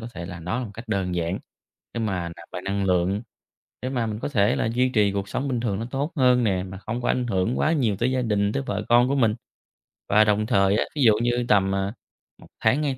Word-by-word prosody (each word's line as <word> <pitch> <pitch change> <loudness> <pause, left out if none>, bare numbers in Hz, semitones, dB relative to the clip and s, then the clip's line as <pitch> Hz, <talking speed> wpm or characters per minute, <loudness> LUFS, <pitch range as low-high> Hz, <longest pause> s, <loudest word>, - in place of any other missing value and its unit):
có 115 - -7
thể 85 - -6
là 90 -1 -7
đó 90 +9 -2
là - - -3
một - - -10
cách 115 +1 -10
đơn 95 -4 -1
giản 85 +1 -1 0.6
để 115 - -2
mà 95 -6 -2
nạp 85 0 -13
lại 90 - -5
năng 100 +1 -1
lượng, 95 +3 +1 0.6
để 130 - -2
mà 120 -4 -1
mình 105 -1 -4
có - - -2
thể 105 -3 +2
là - - 0
duy 125 +1 +3
trì 105 -5 +2
cuộc 100 0 -3
sống 140 +6 -2
bình 125 -3 -1
thường 105 -5 -1
nó 115 - -3
tốt 140 +5 -2
hơn 125 -2 +4
nè, 95 -4 +1
mà 95 0 -8
không 115 +4 -5
có - - 0
ảnh 125 -1 +1
hưởng 100 +2 0
quá 155 - +2
nhiều 120 -10 +1
tới 120 +5 +1
gia 130 -1 0
đình, 105 -2 +1
tới 140 - -1
vợ 105 +1 -2
con 120 +1 +5
của 140 - +1
mình. 115 -6 +3 0.8
Và 105 +2 +6
đồng 105 0 +2
thời 100 -3 +3
á, - - +2
ví 150 - -1
dụ 110 - +7
như 120 0 +1
tầm, 95 -1 +3
à, 95 +2 -1 0.5
1 - - -14
tháng, 130 +7 +2
2 135 -3 -1
110 Hz, 270 wpm, -24 LUFS, 95-125 Hz, 0.8 s, dụ